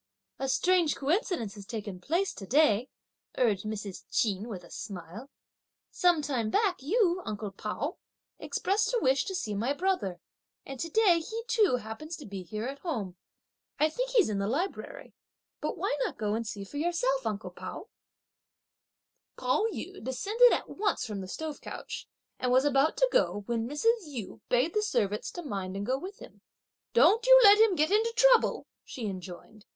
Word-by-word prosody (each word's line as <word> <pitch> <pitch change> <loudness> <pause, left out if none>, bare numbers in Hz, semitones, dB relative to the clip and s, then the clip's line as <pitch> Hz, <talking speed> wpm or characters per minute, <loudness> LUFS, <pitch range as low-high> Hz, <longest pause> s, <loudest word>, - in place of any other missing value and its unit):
"A 270 - -2
strange 355 +1 +3
coincidence 300 - -1
has 200 -2 -11
taken 205 -5 -5
place 350 - 0
to 195 - -9
day," 255 -3 +3 0.5
urged 215 -5 +2
Mrs. 210 -3 -5
Ch'in, 205 -1 0
with 190 -6 -7
a 170 - -15
smile; 195 +5 -8 0.6
"some 350 -4 +3
time 245 -7 -1
back 395 - +1
you, 365 - +2
uncle 210 -1 -5
Pao, 215 - -4 0.4
expressed 415 +3 0
a - - +3
wish 265 - +2
to 380 - -4
see 215 -12 -3
my 230 +7 0
brother, 285 - -1 0.5
and 270 -1 -8
to 330 - -3
day 370 -3 +4
he 445 +8 -5
too 435 - +3
happens 250 +8 -6
to 300 - -10
be 195 -2 -6
here 215 +4 -5
at 275 +2 -5
home. 220 - -4 0.6
I 310 - +4
think - - -2
he's 485 -5 +4
in 205 -2 -1
the 200 - -1
library; 365 - -4 0.5
but 305 - -3
why 365 -3 0
not - - -3
go 210 -1 -1
and 225 0 -2
see 205 -1 -5
for 240 +9 -9
yourself, 275 -6 0
uncle 210 0 -4
Pao?" - - -8 1.5
Pao 255 - +1
yü 385 - -7
descended 415 - +4
at - - 0
once 415 -9 -1
from 210 -4 -5
the 185 - -7
stove 310 +9 -5
couch, - - -7 0.3
and 250 - 0
was 260 +2 +4
about 285 +2 +3
to - - +3
go, 205 - +1
when 230 +1 -2
Mrs. 440 - +1
Yu 245 -9 -7
bade 255 +7 +2
the 425 - +2
servants 210 - -1
to 350 - -7
mind 195 -8 -4
and 200 +1 -3
go 260 +3 0
with 385 +5 -8
him. - - -14 0.5
"Don't 375 - +5
you - - +10
let 410 0 +9
him 440 -4 +5
get 310 +2 +2
into 440 +3 +3
trouble," - - +4 0.2
she 240 - -7
enjoined. 190 +2 -8
270 Hz, 180 wpm, -29 LUFS, -, 1.5 s, you